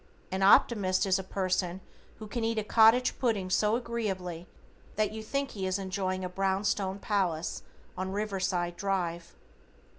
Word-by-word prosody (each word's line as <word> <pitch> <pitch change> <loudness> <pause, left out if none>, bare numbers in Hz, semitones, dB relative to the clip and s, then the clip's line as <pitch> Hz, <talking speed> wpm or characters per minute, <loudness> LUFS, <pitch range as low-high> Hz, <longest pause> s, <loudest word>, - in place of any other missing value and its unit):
An 190 +1 -2
Optimist 195 -1 +4
is 190 0 +2
a - - -4
person 185 -1 -1 0.4
who 220 - -8
can 225 +2 -4
eat 225 0 0
a 215 - 0
cottage 225 +4 +4
pudding 205 -7 0
so 210 +3 +3
agreeably 195 -8 -3 0.5
that 215 -1 +1
you 220 0 -6
think 275 +5 -2
he 190 -3 -3
is 185 +1 0
enjoying 185 -1 -2
a - - -1
brown 195 +1 0
stone 195 -2 0
palace 185 -6 -1 0.3
on 185 +1 -3
Riverside 190 -4 -1
Drive. 175 -3 -2
195 Hz, 155 wpm, -29 LUFS, 185-215 Hz, 0.5 s, Optimist